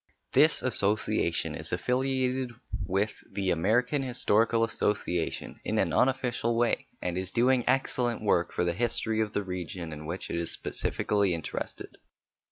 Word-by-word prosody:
This 155 +1 +5
association 105 -6 +1
is - - -4
affiliated 130 -1 0 0.3
with 100 +3 0 0.2
the 95 -2 -1
American 115 - +2
Historical 115 -3 +2
Association 100 -6 -1
in - - -1
an - - +1
unofficial 125 -3 +1
way, 120 0 +1 0.2
and 90 0 -1
is 95 -1 -3
doing 125 +3 +3
excellent 125 -3 +1
work 90 -5 +2
for - - -1
the 85 -1 +1
history 110 +1 0
of 105 -1 -2
the 105 - 0
region 90 -3 -5
in 75 0 -8
which 90 +3 -5
it - - -1
is 85 0 -1
specially 100 -4 0
interested. 80 - -6
110 Hz, 145 wpm, -29 LUFS, 90-125 Hz, 0.3 s, This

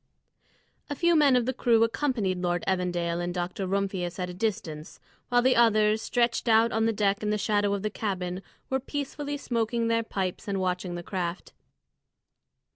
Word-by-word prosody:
A 290 - -3
few 345 +2 +3
men 290 -4 +5
of 245 -2 +2
the 260 - -1
crew 230 -2 +3
accompanied 230 -6 0
Lord 175 -1 -1
Evandale 175 -2 0
and 175 0 -2
Dr. 180 +2 -3
Rumphius 190 -2 -2
at 180 -1 -3
a - - -9
distance, 175 -6 -4 0.3
while 245 0 +3
the 260 0 +4
others, 215 -2 +4
stretched 240 +1 0
out 225 +1 +5
on 225 0 +1
the - - +2
deck 205 -2 +1
in 210 - -1
the 210 - +1
shadow 205 -1 +1
of 200 - -5
the 215 - -1
cabin, 185 -3 -3 0.3
were 265 - 0
peacefully 290 +1 -4
smoking 230 -3 -1
their 230 0 +2
pipes 190 -5 -4
and 195 -1 -1
watching 180 -1 -2
the 175 - -6
craft. 175 -1 -4
210 Hz, 180 wpm, -27 LUFS, 180-235 Hz, 0.3 s, men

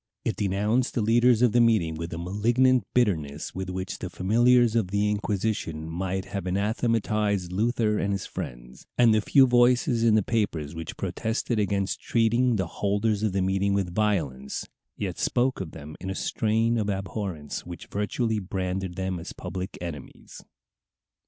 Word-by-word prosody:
It - - 0
denounced 105 +5 0
the 115 - +1
leaders 120 +2 +4
of 120 - +5
the 120 +2 +4
meeting 110 -9 +3
with 85 +1 -5
a 85 - -4
malignant 120 +8 +2
bitterness 80 -12 0
with 95 -1 -4
which 95 0 -4
the 90 - -5
familiars 120 +5 +3
of 110 -5 +2
the 100 +2 0
Inquisition 100 -6 -2
might 95 +3 -3
have 100 -2 -5
anathematized 105 -1 0
Luther 110 +1 +1
and 100 - 0
his 100 -1 -2
friends, - - -8
and 120 -2 +6
the 110 - +3
few 135 +5 +5
voices 120 -1 +3
in 115 -2 +5
the 110 - +3
papers 85 -10 -1
which 80 -1 -7
protested 115 0 -2
against 100 -1 -1
treating 120 +1 +2
the 95 -3 0 0.2
holders 105 +1 +1
of 110 -2 +1
the 95 0 0
meeting 95 +1 +1
with 95 -3 -1
violence, 80 -11 -1 0.3
yet - - -4
spoke 125 -2 +1
of 90 - -5
them 75 -1 -10
in 95 - -5
a 95 - -3
strain 115 +3 +1
of 105 -1 -1
abhorrence 95 -5 -4
which 85 -1 -8
virtually 110 +2 -1
branded 95 -1 -3
them 95 -1 -2
as 85 - -8
public 90 +1 -6
enemies. 80 -6 -8
100 Hz, 165 wpm, -26 LUFS, 90-115 Hz, 0.3 s, and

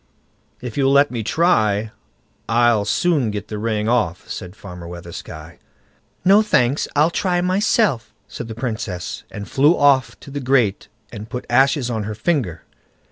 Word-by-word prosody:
"If 125 0 -7
you'll 135 -1 +3
let 140 +1 +4
me 120 -3 -3
try, 110 - +1 0.6
I'll 115 -2 +3
soon 150 -7 +1
get 105 -1 -5
the 105 - -4
ring 110 -1 -1
off", 110 -8 0
said 90 +1 -7
Farmer 90 -4 -10
Weathersky. 85 -1 -9 0.7
"No, 200 +3 +6
thanks, 140 - +1
I'll 150 +4 +4
try 180 0 0
myself", 185 - +1 0.2
said 120 - -7
the 110 - -7
Princess, 110 -7 -4
and 100 0 -7
flew 145 +5 +3
off 130 -5 +3
to 140 - -11
the 145 - -4
grate 125 -7 +1 0.2
and 110 -1 -8
put 125 -1 -5
ashes 135 0 +3
on 110 -3 -2
her 105 0 -5
finger. 110 - -1
120 Hz, 155 wpm, -20 LUFS, 105-145 Hz, 0.7 s, No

